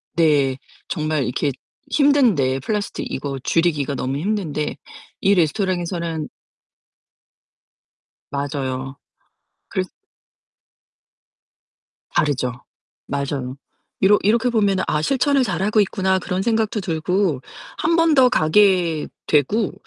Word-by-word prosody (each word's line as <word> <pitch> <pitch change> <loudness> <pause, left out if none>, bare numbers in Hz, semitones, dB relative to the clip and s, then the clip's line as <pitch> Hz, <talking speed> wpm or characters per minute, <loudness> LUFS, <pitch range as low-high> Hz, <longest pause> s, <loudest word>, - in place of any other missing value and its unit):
네. 145 -5 +3 0.3
정말 155 -4 -1
이렇게 135 +3 -1 0.4
힘든데 235 - +3
플라스틱 205 +8 -3
이거 135 -1 -4
줄이기가 150 -5 +1
너무 130 +2 -2
힘든데 165 -5 -2 0.5
이 200 +1 +4
레스토랑에서는 170 -2 -1 2.0
맞아요. 135 -1 -3 0.7
그래서 - - -2 2.3
다르죠. 125 -4 0 0.4
맞아요. 140 -2 -3 0.4
이러 205 +2 +5
이렇게 230 +4 +3
보면은 205 -5 +2
'아 150 - +1
실천을 275 - +2
잘하고 200 +2 0
있구나.' 190 -1 +1
그런 185 0 -2
생각도 220 0 0
들고 170 -2 0 0.4
1 330 +2 +1
번 330 -2 +4
더 255 -2 +6
가게 175 -5 +3 0.2
되고 185 - +2
170 Hz, 225 characters per minute, -21 LUFS, 145-210 Hz, 2.3 s, 더